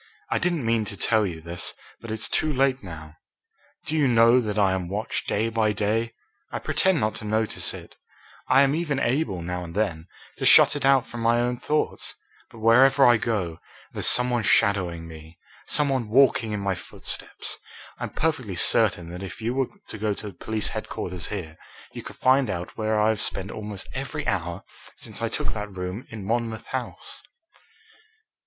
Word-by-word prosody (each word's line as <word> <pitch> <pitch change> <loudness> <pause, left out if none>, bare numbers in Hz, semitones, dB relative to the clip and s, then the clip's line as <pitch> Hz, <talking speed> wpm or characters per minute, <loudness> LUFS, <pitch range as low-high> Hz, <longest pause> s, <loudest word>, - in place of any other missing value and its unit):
I - - +2
didn't 170 -7 0
mean 115 -1 +2
to 100 - -7
tell 110 -2 +2
you 80 -3 -6
this, 85 +2 -5 0.2
but 115 - -10
it's 110 0 0
too 155 - +1
late 135 -1 +2
now. 80 -4 -10 0.7
Do 155 - -2
you 150 -3 +3
know 115 +1 +6
that 105 -2 -3
I 100 -2 +4
am 90 -2 -2
watched, 105 +3 -3
day 110 +2 +1
by 110 -2 +1
day? 110 +3 0 0.4
I - - -2
pretend 190 -3 +1
not 110 -2 0
to - - -10
notice 110 +1 -1
it - - -11 0.5
I 135 +2 +6
am 140 0 +2
even 150 -4 -1
able, 120 - 0
now 90 +1 -3
and 85 0 -9
then, 90 -6 -1 0.3
to - - -2
shut - - +8
it 145 - -2
out 135 -2 +5
from 120 - -8
my 115 +1 +3
own 120 +1 0
thoughts 150 +4 -1 0.3
but - - -15
wherever 130 +5 +6
I 120 -1 +7
go 100 -8 -2 0.3
there's - - -1
some 125 0 +4
one 120 -1 +1
shadowing 90 -6 +2
me, 80 +1 -12 0.3
some 150 -1 +3
one 130 -5 -1
walking 120 -2 +4
in 105 -1 -2
my 100 -1 0
footsteps. - - -6 0.4
I'm - - -3
perfectly 130 - -1
certain 85 0 +3
that 90 +1 -7
if 95 +3 -7
you 115 +2 -1
were 135 -1 +1 0.2
to 110 - -7
go 105 -1 0
to 105 -1 -6
police 110 +5 -1
headquarters 90 -2 -5
here, 80 -6 -6 0.4
you - - -6
could - - -10
find 130 -1 +3
out 90 -2 -4
where 110 -1 0
I 105 +1 +4
have 110 -3 0
spent 95 +1 -2
almost 105 -2 -7
every - - -4
hour - - -2 0.3
since - - -6
I - - 0
took - - -1
that 105 -1 -5
room 90 +6 -5
in 110 -4 -7
Monmouth 115 0 -2
House." - - -5
110 Hz, 190 wpm, -25 LUFS, 95-125 Hz, 0.7 s, shut